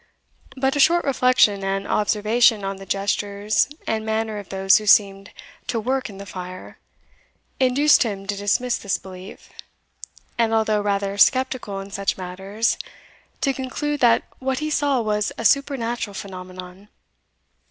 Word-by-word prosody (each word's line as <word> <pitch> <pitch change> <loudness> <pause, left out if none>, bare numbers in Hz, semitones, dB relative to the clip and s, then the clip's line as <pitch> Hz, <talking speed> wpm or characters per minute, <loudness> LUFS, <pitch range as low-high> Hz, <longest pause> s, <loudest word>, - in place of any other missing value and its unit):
But 265 +1 +1
a - - -1
short 345 +4 +4
reflection 250 -7 +3
and 195 +1 -2
observation 215 +1 +2
on 195 0 -3
the 195 0 -11
gestures 205 +2 0 0.2
and 220 -1 -1
manner 220 -1 -2
of 200 - -11
those 195 0 +4
who 215 - -8
seemed 195 -1 +4 0.4
to 235 - -1
"work 260 +2 -2
in 200 - -11
the 200 - -8
fire," 185 -1 -9 0.8
induced 270 +3 +4
him 200 -5 -2
to 205 0 -2
dismiss 205 +5 0
this 200 - -1
belief, 185 0 -12 0.9
and 225 -1 +2
although 215 -1 +1
rather 200 0 -1
sceptical 255 -5 +2
in 195 +1 -10
such 200 -1 -2
matters, 195 +5 -2 0.6
to 275 - +1
conclude 290 +3 -3
that 235 -2 +4 0.2
what 265 0 -2
he 305 +3 -3
saw 285 -4 +1
was 210 -1 -1
a 230 - -5
supernatural 240 -5 0
phenomenon. 185 0 -9
210 Hz, 145 wpm, -22 LUFS, 195-250 Hz, 0.9 s, short